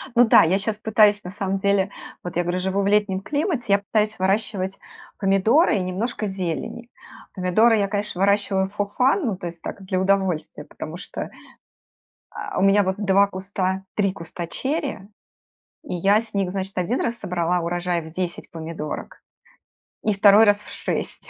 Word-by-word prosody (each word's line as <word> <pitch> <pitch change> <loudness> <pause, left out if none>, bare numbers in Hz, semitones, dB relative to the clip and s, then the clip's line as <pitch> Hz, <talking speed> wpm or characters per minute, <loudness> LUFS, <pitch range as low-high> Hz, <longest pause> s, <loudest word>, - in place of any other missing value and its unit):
Ну 245 - +7
да, - - +7
я 180 +4 +2
щас 210 +1 -2
пытаюсь, 210 -1 +3
на 180 - -6
самом 195 0 -2
деле 200 0 +1 0.3
Вот 175 - -6
я 175 - +2
говорю, 175 +1 -1
живу 190 +2 0
в 195 - 0
летнем 205 -2 +2
климате. 290 - -1
Я 200 - +5
пытаюсь 215 +1 0
выращивать 195 0 -1 0.4
помидоры 210 - +3
и 195 - 0
немножко 205 +5 -3
зелени. 190 +5 -4 0.5
Помидоры 215 +5 +3
я, 200 -1 +1
конечно, 205 -2 -3
выращиваю 195 -1 +2
for 205 0 -1
fun, 270 +8 +3
ну, 205 -6 -1
то 175 - -6
есть 170 -1 -9
так, 200 - -7
для 185 -1 -1
удовольствия, 190 -6 0
потому 155 +2 -8
что, 180 - -6 1.0
а, - - -6
у - - +1
меня 195 +1 +5
вот 190 0 -1
2 200 -1 +3
куста 190 0 -3
3 195 -2 +1
куста 170 -1 -7
черри, 280 - -2 0.9
и 290 - -5
я 195 +4 +3
с 225 -2 -12
них, 195 -2 0
значит, 195 +1 -4
1 185 +8 0
раз 235 0 -1
собрала 180 -2 -1
урожай 175 0 -1
в 160 - -10
10 175 +1 -4
помидорок, 160 -2 -6 0.8
и 215 - +2
2 200 +2 +7
раз- 205 -1 +4
в - - -13
6. - - -4
195 Hz, 175 wpm, -23 LUFS, 180-210 Hz, 1.0 s, Ну